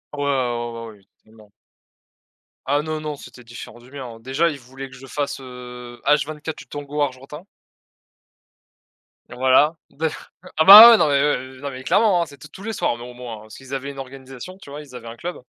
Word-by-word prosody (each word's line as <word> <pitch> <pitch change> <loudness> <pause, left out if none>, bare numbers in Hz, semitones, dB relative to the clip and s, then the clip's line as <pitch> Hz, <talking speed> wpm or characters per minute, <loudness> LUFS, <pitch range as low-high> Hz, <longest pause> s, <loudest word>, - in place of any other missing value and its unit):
Ouais, 145 - -5
ouais, - - -1
ouais 120 -3 -1
ben 115 0 -8
oui. 100 0 -27
Totalement. 110 -1 -21 1.1
Ah 145 +2 +1
non, 155 0 -4
non 150 -2 -5
c'était 125 - -13
différent 120 0 -11
du 125 +2 -18
mien, 140 -2 -7
hein. 115 -2 -10
Déjà 135 +7 0
il 150 - -6
voulait 130 +1 -10
que - - -14
je 135 - -13
fasse, 140 +1 -4
heu, 125 -1 -10
H24 150 +2 0
du - - -11
tango 145 0 -5
argentin. 140 +4 -4 1.9
Voilà. 130 +5 +3
D 160 +2 -2 0.5
ah 160 - +3
bah 210 +4 +13
ouais, 230 - +7
non 155 - +3
mais 140 - +2
heu, 130 -2 -1
eh - - -16
non 140 - -4
mais 130 0 -9
clairement 200 +1 +3
hein, - - 0
c'était 145 -1 -14
tous 185 - -13
les 225 +1 -4
soirs 120 - -1
mais 120 - -10
au - - -11
moins 120 -3 -8
hein. - - -13
Parce 110 - -14
qu'ils 135 0 -11
avaient 135 +1 -4
une 140 - -14
organisation 135 +6 -10
tu 190 - -14
vois? 145 +2 -8
Ils 135 -4 -14
avaient 115 -1 -9
un 115 - -8
club 175 0 -7
135 Hz, 220 wpm, -21 LUFS, 125-150 Hz, 1.9 s, bah